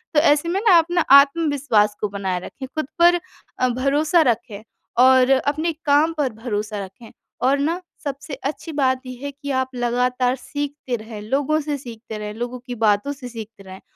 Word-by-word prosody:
तो 300 Hz, -, +7 dB
ऐसे 295 Hz, +1 st, +3 dB
में 380 Hz, +3 st, 0 dB
ना, 360 Hz, -, +8 dB
अपना 345 Hz, +2 st, +1 dB, 0.2 s
आत्मविश्वास 280 Hz, -8 st, +2 dB
को 210 Hz, -, -1 dB
बनाएँ 190 Hz, -2 st, -2 dB
रखें, 265 Hz, -1 st, -8 dB
खुद 310 Hz, -3 st, -2 dB
पर 350 Hz, 0 st, +6 dB, 0.4 s
अ, 255 Hz, -, +2 dB
भरोसा 290 Hz, +7 st, +2 dB
रखें 220 Hz, -2 st, -6 dB, 0.4 s
और 260 Hz, 0 st, +5 dB
अपने 295 Hz, +5 st, +1 dB
काम 295 Hz, +3 st, +3 dB
पर 260 Hz, -6 st, 0 dB
भरोसा 210 Hz, -3 st, -3 dB
रखें, 220 Hz, +4 st, -15 dB, 0.3 s
और 270 Hz, +3 st, +3 dB
ना, 330 Hz, +5 st, -1 dB, 0.2 s
सबसे 275 Hz, +1 st, -5 dB, 0.2 s
अच्छी 320 Hz, +2 st, -10 dB
बात 260 Hz, 0 st, +2 dB
ये 255 Hz, -1 st, -7 dB
है 285 Hz, -, -3 dB
कि 285 Hz, 0 st, -7 dB
आप 260 Hz, 0 st, -6 dB
लगातार 250 Hz, +1 st, 0 dB
सीखते 285 Hz, -1 st, -4 dB
रहें, 215 Hz, -1 st, -9 dB
लोगों 280 Hz, +7 st, 0 dB
से 290 Hz, -1 st, -3 dB
सीखते 230 Hz, -4 st, -9 dB
रहें, 210 Hz, 0 st, -5 dB
लोगों 245 Hz, +2 st, -5 dB
की 245 Hz, -, -4 dB
बातों 210 Hz, +7 st, +2 dB
से 270 Hz, -3 st, -9 dB
सीखते 220 Hz, -3 st, -10 dB
रहें। 190 Hz, 0 st, -11 dB
260 Hz, 180 wpm, -21 LUFS, 225-290 Hz, 0.4 s, ना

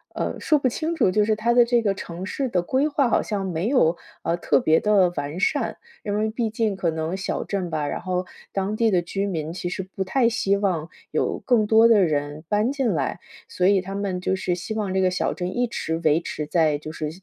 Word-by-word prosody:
呃， -, -, -2 dB
说 305 Hz, -, +3 dB
不 265 Hz, -, +1 dB
清 315 Hz, +7 st, -2 dB
楚， 195 Hz, -, +3 dB
就 210 Hz, +3 st, +3 dB
是 215 Hz, +1 st, +2 dB
它 230 Hz, +3 st, +1 dB
的 245 Hz, -, +7 dB
这 235 Hz, 0 st, +2 dB
个 200 Hz, -3 st, +1 dB
城 175 Hz, -1 st, -7 dB
市 260 Hz, +5 st, -2 dB
的 180 Hz, -5 st, +1 dB
规 265 Hz, +10 st, +1 dB
划， 285 Hz, -3 st, +2 dB
好 -, -, +3 dB
像 200 Hz, -3 st, -3 dB
没 180 Hz, +1 st, -2 dB
有， 180 Hz, -, +3 dB, 0.3 s
呃， 170 Hz, -, +1 dB
特 150 Hz, -5 st, +2 dB
别 160 Hz, +1 st, +3 dB
的 200 Hz, -4 st, +4 dB
完 145 Hz, +4 st, -4 dB
善。 -, -, 0 dB, 0.3 s
因 205 Hz, -1 st, -2 dB
为 215 Hz, +1 st, +1 dB
毕 230 Hz, -1 st, -1 dB
竟 220 Hz, -2 st, -1 dB
可 185 Hz, -3 st, 0 dB
能 160 Hz, +2 st, -2 dB
小 195 Hz, -, -3 dB
镇 190 Hz, -3 st, -3 dB
吧， 155 Hz, -2 st, -2 dB
然 -, -, -3 dB
后 185 Hz, -1 st, -2 dB, 0.3 s
当 195 Hz, +2 st, -1 dB
地 225 Hz, +1 st, +2 dB
的 180 Hz, -2 st, +3 dB
居 195 Hz, +3 st, -2 dB
民， 160 Hz, -4 st, -3 dB
其 175 Hz, -1 st, -4 dB
实 190 Hz, -, -4 dB
不 190 Hz, +1 st, -5 dB
太 235 Hz, +6 st, +2 dB
希 225 Hz, -4 st, +1 dB
望 180 Hz, -6 st, -1 dB, 0.2 s
有 -, -, 0 dB
更 230 Hz, -4 st, +3 dB
多 225 Hz, +2 st, +6 dB
的 220 Hz, -3 st, +5 dB
人 150 Hz, -1 st, -1 dB
搬 210 Hz, +5 st, +2 dB
进 270 Hz, -5 st, 0 dB
来， -, -, -2 dB, 0.3 s
所 180 Hz, -, +1 dB
以 200 Hz, 0 st, +5 dB
他 195 Hz, +1 st, -7 dB
们 195 Hz, -2 st, -2 dB
就 185 Hz, +1 st, 0 dB
是 185 Hz, -2 st, -1 dB
希 175 Hz, +5 st, -5 dB
望 210 Hz, -4 st, -2 dB
这 190 Hz, -, +3 dB
个 185 Hz, -1 st, +2 dB
小 185 Hz, -, 0 dB
镇， 180 Hz, +1 st, -4 dB
一 245 Hz, 0 st, +1 dB
直 160 Hz, -8 st, -3 dB
维 155 Hz, +1 st, +4 dB
持 155 Hz, -2 st, -5 dB
在 155 Hz, -2 st, +2 dB
就 155 Hz, +1 st, -7 dB
是 155 Hz, -1 st, -4 dB
195 Hz, 260 characters per minute, -24 LUFS, 175-220 Hz, 0.3 s, 的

